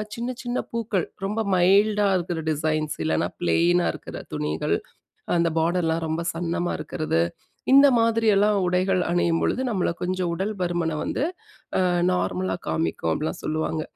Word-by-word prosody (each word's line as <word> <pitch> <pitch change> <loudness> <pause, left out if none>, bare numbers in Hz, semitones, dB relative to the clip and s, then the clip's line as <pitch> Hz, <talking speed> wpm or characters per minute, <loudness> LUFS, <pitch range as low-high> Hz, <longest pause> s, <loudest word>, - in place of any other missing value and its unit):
சின்ன 235 +2 -3
சின்ன 245 0 -2
பூக்கள், 225 -6 -1 0.2
ரொம்ப 210 +3 -2 0.2
மைல்டா 200 +3 +4
இருக்கிற 175 -2 -3
டிசைன்ஸ், 155 0 -1
இல்லனா 80 0 +1
ப்ளைனா 170 - +3
இருக்கற - - -9 0.2
துணிகள், 75 +1 -1 0.6
அந்த 170 0 +3
பார்டர்லாம் 165 0 +1
ரொம்ப 160 +2 -1
சன்னமா 175 +1 -2
இருக்கறது. 155 - -1 0.5
இந்த 275 +1 +9
மாதிரியெல்லாம் 220 -3 +3
உடைகள் 185 +1 +2
அணியும்பொழுது, 170 +6 +1
நம்மள 185 -5 0
கொஞ்சம் 185 -1 -1
உடல் 195 +5 -2
பருமனை 175 -3 -1
வந்து - - -2 0.6
அ - - +2 0.3
நார்மலா 95 - -1
காமிக்கும், 80 +1 -1
அப்படிலாம் 155 - -3
சொல்லுவாங்க. 155 0 -1
175 Hz, 130 wpm, -24 LUFS, 155-200 Hz, 0.6 s, இந்த